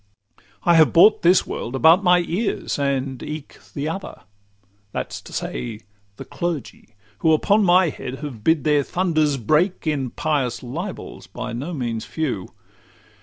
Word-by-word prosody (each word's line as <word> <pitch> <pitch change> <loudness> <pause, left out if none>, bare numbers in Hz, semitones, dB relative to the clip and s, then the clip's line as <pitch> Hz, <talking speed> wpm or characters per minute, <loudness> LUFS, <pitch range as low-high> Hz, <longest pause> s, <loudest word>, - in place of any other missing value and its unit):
I 175 - +4
have 160 -2 +5
brought 195 +6 +6
this 180 +2 +4
world 120 - -5
about 165 +8 +5
my 180 -1 +5
ears, 180 -1 -2
and 135 -2 -1
eke 150 -1 -7 0.2
The 145 +1 -2
other; 190 +5 -6 0.7
that - - -4
's - - -6
to - - -13
say, 115 -3 -5 0.4
the - - -8
clergy, 150 -9 -5 0.2
who 160 - +3
Upon 205 +7 +3
my 180 -1 +5
head 130 -2 -6
have 135 -7 -8
bid 160 -1 +2
their 150 -1 +3
thunders 155 -3 0
break 155 - +1
In 145 -5 -1
pious 130 -5 -1
libels 170 +11 -7
by 125 -1 -6
no 135 +9 -4
means 115 -5 -3
a - - -11
few. 130 - -3
150 Hz, 160 wpm, -22 LUFS, 130-175 Hz, 0.7 s, brought